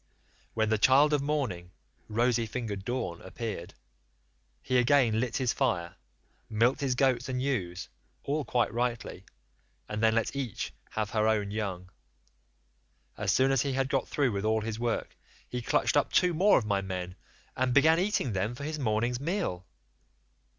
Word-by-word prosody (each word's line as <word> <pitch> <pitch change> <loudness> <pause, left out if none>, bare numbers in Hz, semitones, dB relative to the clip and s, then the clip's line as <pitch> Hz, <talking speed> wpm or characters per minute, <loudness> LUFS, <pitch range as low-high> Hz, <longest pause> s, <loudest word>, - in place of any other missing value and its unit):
"When 110 -1 +1
the 110 -1 +1
child 140 +6 +5
of 145 - +2
morning, 130 -13 -2 0.4
rosy 115 +1 +1
fingered 110 -4 -4
dawn, 95 -8 -3
appeared, 95 -3 -6 0.9
he 130 -1 +2
again 120 -3 +3
lit 125 +4 -1
his 130 -3 +1
fire, 90 -11 0 0.6
milked 115 +6 +2
his 135 -3 0
goats 130 -1 +1
and 125 -1 -1
ewes, 110 -11 -2 0.4
all 150 +2 -1
quite 120 -1 0
rightly, 115 -5 -3 0.6
and 105 0 -4
then 110 0 +4
let 115 +4 0
each 135 -5 -4 0.2
have 105 -1 -3
her 110 -1 +2
own 105 -2 +1
young 100 -4 -3
one; 90 - -19 1.3
as - - 0
soon 135 +1 +3
as 135 -3 +3
he 140 -2 -1
had 135 0 0
got 135 -2 0
through 140 -4 +1
with 100 -1 -2
all 110 0 +1
his 110 0 -4
work, 120 -1 -2 0.3
he 125 - -4
clutched - - +1
up - - +2
two 180 -1 +3
more 190 +6 +5
of 115 - 0
my 100 -2 +1
men, 90 -1 -5 0.4
and 130 0 +1
began 160 +6 +5
eating 185 - 0
them 100 +5 -1
for 140 - -8
his 155 +1 -4
morning's 120 0 0
meal. 140 - -2
120 Hz, 170 wpm, -29 LUFS, 105-135 Hz, 1.3 s, child